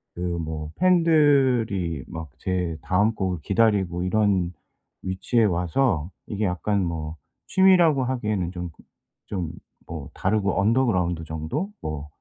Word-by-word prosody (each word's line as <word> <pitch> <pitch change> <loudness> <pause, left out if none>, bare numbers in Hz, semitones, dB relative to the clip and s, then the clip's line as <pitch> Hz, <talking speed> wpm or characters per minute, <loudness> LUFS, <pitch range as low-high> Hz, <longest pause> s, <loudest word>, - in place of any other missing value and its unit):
그 90 - -7 0.2
뭐 80 -1 -5
팬들이 135 - +3
막 80 -2 -7
제 90 -3 -2
다음 105 +5 +2
곡을 95 -4 -2
기다리고 95 -4 +2
이런 95 -3 +2 0.5
위치에 95 +5 +1
와서 90 - +1 0.2
이게 105 +1 -2
약간 95 +2 0
뭐 80 -2 -4 0.3
취미라고 175 -8 +5
하기에는 105 -8 -1
좀 90 -1 -5
그 - - -18 0.4
좀 90 -5 -3 0.4
뭐 80 -5 -7
다르고 100 0 0
언더그라운드 100 -7 +1
정도 80 - -3
뭐 75 -1 -5
95 Hz, 250 characters per minute, -24 LUFS, 85-115 Hz, 0.5 s, 취미라고